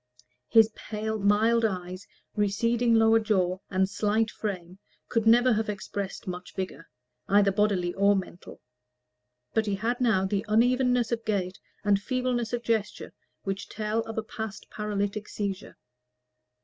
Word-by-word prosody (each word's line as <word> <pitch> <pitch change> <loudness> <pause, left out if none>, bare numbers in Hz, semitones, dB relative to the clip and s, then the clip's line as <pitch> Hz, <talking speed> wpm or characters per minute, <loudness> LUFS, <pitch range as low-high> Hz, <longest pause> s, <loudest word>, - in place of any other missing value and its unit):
His 225 -1 +5
pale 220 0 -4
mild 215 +3 +3
eyes, 185 -2 -3 0.3
receding 230 +3 +2
lower 225 0 +5
jaw, 185 -4 +1
and 190 0 +2
slight 215 +2 0
frame, 185 -3 -5 0.3
could 225 -2 0
never 245 +2 +6
have 220 0 -1
expressed 200 -1 -5
much 180 0 -7
vigor, 185 -4 -5 0.4
either 200 0 +4
bodily 190 -3 +1
or 200 +1 +4
mental; 185 -2 -6 0.9
but 220 -1 +1
he 200 - 0
had 235 +5 -2
now 220 -6 +3
the 195 +1 -1
unevenness 245 +2 +2
of 230 -1 -1
gait 190 -3 -2 0.2
and 200 -1 +3
feebleness 250 -1 -1
of 240 -1 -2
gesture 220 -3 -2 0.3
which 195 0 -4
tell 215 +1 -2
of 225 - -7
a 220 - 0
past 220 -2 -7
paralytic 210 0 -3
seizure. 200 -2 -4
210 Hz, 140 wpm, -27 LUFS, 195-225 Hz, 0.9 s, never